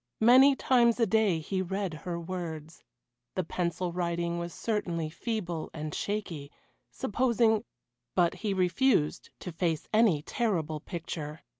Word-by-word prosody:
Many 260 +5 +7
times 240 -3 +3
a 230 - +5
day 215 -4 +3
he 185 +4 -2
read 190 -1 -2
her 170 +2 -5
words; 165 -3 -6 0.5
the 185 - 0
pencil 175 +1 -2
writing 170 -1 -1
was 170 0 -4
certainly 170 -8 -2
feeble 175 -5 -3
and 155 -1 -5
shaky 175 -9 -3 0.4
supposing 220 - +1 0.5
But 175 -2 +3
he 210 -2 -3
refused 185 - +2
to 180 - -5
face 165 -1 -1
any 210 -10 +4
terrible 165 -10 -1
picture. 160 -2 -6
180 Hz, 130 wpm, -29 LUFS, 165-215 Hz, 0.5 s, Many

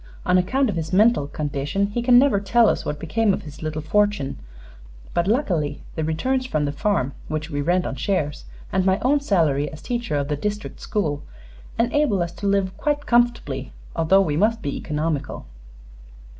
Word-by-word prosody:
On 180 - +3
account 255 +10 +2
of 205 - -2
his 160 -1 -3
mental 205 -6 +4
condition 145 +6 -2
he 235 +4 -2
can 245 0 +6
never 260 -5 +4
tell 225 +4 +4
us - - -1
what 150 - -3
became 200 +5 +1
of - - -8
his 150 -1 -11
little 155 -1 -3
fortune; 205 -3 +1 0.7
but 170 +1 +1
luckily 175 - 0
the 160 - -2
returns 255 +12 0
from 155 -11 0
the 145 - -1
farm, 145 - 0
which 155 +1 -4
we 145 0 -1
rent 175 +4 +1
on - - -3
shares, 150 +1 -2 0.3
and 190 0 +2
my 190 0 +3
own 285 +3 +3
salary 155 - +1
as 155 - -9
teacher 235 -6 -3
of 140 -1 0
the 150 - -1
district 210 +7 -4
school, 150 -9 -2 0.6
enable 235 -5 +2
us 170 - -5
to 200 +3 -4
live 195 -1 +1
quite 290 -1 -1
comfortably, 235 - +1 0.2
although 165 +4 +4
we 155 -6 0
must 220 +6 +1
be 140 - -2
economical." 150 -2 -3
185 Hz, 185 wpm, -23 LUFS, 150-220 Hz, 0.7 s, can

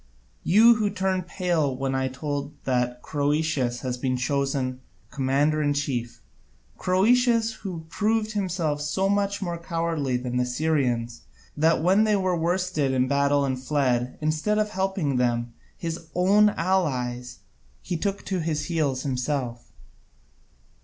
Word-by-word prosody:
You 225 +5 +6
who 215 -2 +1
turn 190 -1 -1
pale 170 -6 -1
when 135 +1 -2 0.2
told 145 +1 -4
that 125 -1 -1
Croesus 145 -4 0
has 125 -1 -3
been 130 -1 0
chosen 135 -1 -1 0.3
commander 145 +3 +1
in 145 -1 +1
chief, 125 -5 -3 0.5
Croesus 230 +4 +3
who 175 -5 -6
proved 215 +4 0
himself 175 -7 -1
so 150 +6 0
much 200 0 0
more 170 -2 -3
cowardly 165 -6 -1
than 125 0 -3
the 125 - +2
Syrians, 125 -4 0 0.3
that 160 +1 +2
when 190 +5 +4
they 215 -1 +3
were 185 -2 +1
worsted 170 -4 0
in 130 0 +2
battle 140 +1 +2
and 130 -1 -2
fled, 130 -3 0
instead 155 +7 0
of 210 0 0
helping 190 -8 -1
them, 120 -1 0 0.2
his 165 -1 -5
own 200 +4 +5
allies, 130 - -1 0.5
he 180 - -3
took 200 +4 -2
to 190 -2 -1
his 160 -2 -2
heels 145 -6 -1
himself. 125 -2 -3
155 Hz, 135 wpm, -25 LUFS, 130-185 Hz, 0.5 s, You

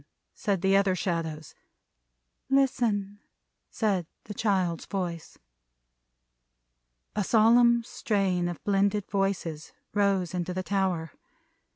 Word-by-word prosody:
said 200 -5 -2
the 195 0 +4
other 195 -1 +3
Shadows. 160 -4 -3 1.0
"Listen!" 230 -7 +1 0.5
said 195 -7 0 0.2
the 210 - -7
child's 190 -6 0
voice. 175 -4 -4 1.8
A 210 - +1
solemn 235 +3 +5
strain 195 -6 0
of 175 -2 -6
blended 200 0 +1
voices 195 -6 -2 0.2
rose 195 -4 +1
into 180 0 -3
the 185 - -2
tower. 185 -5 -1
195 Hz, 95 wpm, -28 LUFS, 175-205 Hz, 1.8 s, solemn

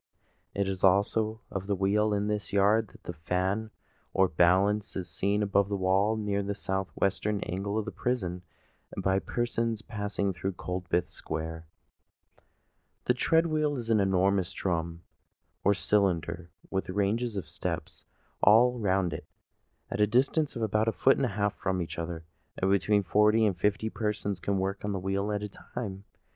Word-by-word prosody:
It 100 -1 0
is 95 -1 -4
also 105 +3 +3
of 95 0 -4
the 100 - +1
wheel 105 +3 +2
in 105 0 0
this 105 -1 -2
yard 105 +2 +3
that - - -18
the 85 - -5
fan, 90 +6 -1 0.5
or 95 - +5
balance, 95 +5 +2
is 95 -2 -3
seen 100 +5 0
above 100 0 +2
the 100 - -1
wall 95 +4 +2
near 100 -2 -1
the 100 0 -3
south 95 -1 -2
western 100 +2 0
angle 100 +4 -3
of 110 - -1
the - - -4
prison, 90 -8 -2 0.6
by 95 0 +2
persons 115 +3 -2
passing 100 -2 -2
through 95 +3 -3
Coldbath 90 -1 -2
Square. 80 0 -5 1.4
The 125 - +4
tread 160 +6 +3
wheel 155 -2 +1
is 115 -2 -3
an 110 - +4
enormous 95 -1 +2
drum, 85 -2 -2 0.6
or 100 +1 +4
cylinder, 90 -2 0 0.2
with 95 -1 -2
ranges 105 +4 0
of 90 - -4
steps - - -5 0.4
all 120 +4 +5
round 95 -5 +1
it, - - -7 0.6
at - - -1
a 105 - +5
distance 135 +7 +1
of 115 - -2
about 110 +1 +1
a - - +4
foot 135 +4 +3
and 130 - +1
a 105 -3 -6
half 105 0 +1
from 95 -1 -2
each 85 -1 -4
other. 85 -1 -5 0.3
Between 100 +2 +2
forty 105 +4 +4
and 100 -3 +1
fifty 105 +5 0
persons 105 -3 -2
can 100 +3 -1
work 95 +1 -2
on 105 0 -1
the 95 - -2
wheel 100 +2 -1
at 105 -1 -1
one 105 - -4
time. 100 -5 -7
100 Hz, 170 wpm, -29 LUFS, 95-105 Hz, 1.4 s, or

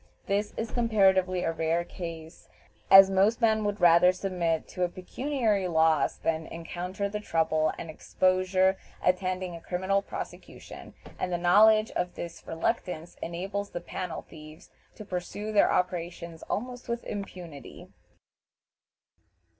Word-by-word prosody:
This 205 +1 -1
is 225 0 -3
comparatively 190 -6 +2
a - - 0
rare 165 +1 0
case, 165 -2 -9 0.4
as 195 0 +9
most 195 +4 +3
men 220 -2 +2
would 205 0 -2
rather 175 +1 +6
submit 180 -4 -2
to 180 - -7
a 175 - +1
pecuniary 215 +1 -1
loss 160 -2 +2
than 160 -1 -2
encounter 180 +4 -4
the 210 +1 -4
trouble 160 -5 +1
and 165 - -7
exposure 185 +3 +1 0.3
attending 185 -1 0
a 165 - -10
criminal 190 +3 0
prosecution, - - -9 0.2
and 180 - -2
the 175 - 0
knowledge 215 +5 +5
of 180 - -3
this 170 -1 -7
reluctance 170 -1 -3
enables 195 +4 -4
the 175 - -5
"panel 175 0 -6
thieves" 155 -1 -14 0.2
to 215 - -10
pursue 205 +3 -5
their 210 - +4
operations 170 -2 -2
almost 245 +2 -4
with 235 0 -2
impunity. 180 -7 -8
185 Hz, 130 wpm, -28 LUFS, 170-200 Hz, 0.4 s, as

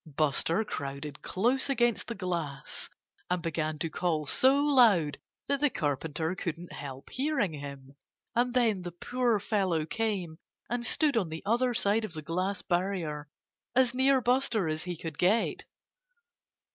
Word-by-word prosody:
Buster 160 +7 +1
crowded 140 -5 -5
close 245 +9 +1
against 240 -4 +1
the 235 - -4
glass 170 -8 -4 0.4
and 180 0 +1
began 155 -2 -2
to 165 - -1
call 160 -4 0
so 260 - +4
loud 235 - +4 0.3
that 280 0 +1
the 295 +1 +3
Carpenter 155 - -2
couldn't 175 -2 -5
help 135 -1 -7
hearing 265 - 0
him. 140 -2 -8 0.4
And 245 +1 +2
then 225 -6 +3
the 175 -1 -6
poor 245 +4 +1
fellow 195 -6 0
came 185 -5 -2 0.3
and 240 0 -1
stood 290 +3 +3
on 195 -8 +1
the 160 +1 -6
other 240 +3 +2
side 215 +1 +2
of 215 - -5
the 155 -1 -6
glass 185 +5 -2
barrier, 175 -5 -1 0.5
as 255 -1 +4
near 265 +1 +4
Buster 245 -6 +2
as 155 0 -1
he 180 -2 -4
could 160 -2 -6
get. 200 +6 +2
185 Hz, 150 wpm, -30 LUFS, 160-240 Hz, 0.5 s, so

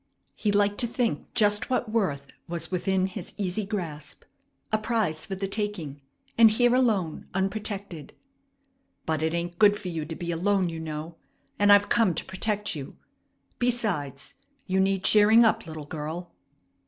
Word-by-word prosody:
He 210 - 0
liked 205 0 +2
to 240 - +1
think 235 0 -2
just 210 0 +3
what 245 -3 -1
worth 155 -12 0 0.2
was 170 -1 -3
within 185 +1 0
his 190 -1 -7
easy 200 +1 -1
grasp. 160 -8 -5 0.5
A 215 - +2
prize 215 -8 -1
for 195 - -4
the 195 +1 -3
taking, 195 -9 -4 0.4
and 225 -1 +9
here 240 +3 +3
alone, 215 -11 +1
unprotected. 195 -5 -3 0.9
"But 160 -1 -1
it 160 +1 0
ain't 170 0 -4
good 205 -1 +6
for 185 - -5
you 160 -3 -4
to 160 +1 -6
be 175 +1 -4
alone, 185 +2 +1
you 165 -1 -6
know, 160 +1 -6 0.4
and 205 0 +5
I've 205 0 +6
come 220 -8 +3
to - - -3
protect 210 +1 -2
you. 140 -3 -8 0.6
Besides, 205 - -1 0.3
you 190 0 0
need 195 0 +1
cheering 215 +2 +6
up, 220 - +1
little 155 -2 -7
girl." 160 +4 -6
190 Hz, 160 wpm, -26 LUFS, 165-210 Hz, 0.9 s, and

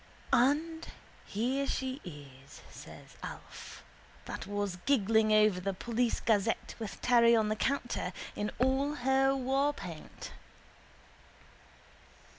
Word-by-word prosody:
—And 315 +6 +2 0.4
here 260 +7 -1
she 265 +2 -3
is, 140 -5 -12
says - - -12
Alf, - - -9 0.4
that - - -6
was 205 -2 -2
giggling 220 -4 +3
over 215 -3 +4
the 195 +1 -2
Police 235 +3 0
Gazette 220 0 +1
with 220 -3 -6
Terry 235 -1 +6
on 220 -2 +2
the 215 - 0
counter, 245 -5 -1 0.2
in 210 0 -2
all 265 +3 +1
her 270 0 +2
warpaint. 270 - -2
235 Hz, 105 wpm, -31 LUFS, 205-270 Hz, 0.4 s, Terry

